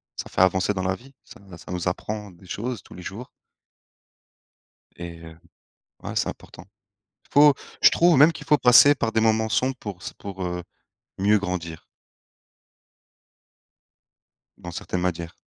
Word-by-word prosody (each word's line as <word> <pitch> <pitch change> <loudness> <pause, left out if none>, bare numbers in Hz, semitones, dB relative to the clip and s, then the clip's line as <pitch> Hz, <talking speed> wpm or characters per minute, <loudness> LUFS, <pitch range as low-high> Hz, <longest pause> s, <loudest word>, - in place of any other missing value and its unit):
ça - - -7
fait - - -5
avancer 95 +2 +3
dans 95 -2 -3
la 95 0 0
vie, 135 +6 -17
ça - - -15 0.2
ça - - -12
nous 90 -1 -3
apprend 105 +3 -6
des 90 +1 -19
choses, 115 +4 -5
tous - - -15
les 90 - -10
jours 110 +8 -8 1.7
Et 85 -1 -8
heu 80 0 -12 0.7
ouais, - - -6
c'est - - +1
important. - - -10 0.7
Faut 145 0 +7 0.3
je - - +8
trouve 170 -3 +4
même 150 +5 +7
qu'il 150 -1 -10
faut 150 -2 +5
passer 125 +3 +7
par 115 -4 -2
des 110 - +1
moments 110 0 +2
sombres 130 +3 0
pour 100 -4 -8
s - - -7
pour, 95 -2 -7
heu, 90 0 -4 0.5
mieux 105 +2 +3
grandir 85 -4 -5 2.7
dans 85 - -9
certaines 90 +2 -4
matières. 85 -1 -3
100 Hz, 155 wpm, -24 LUFS, 90-125 Hz, 2.7 s, je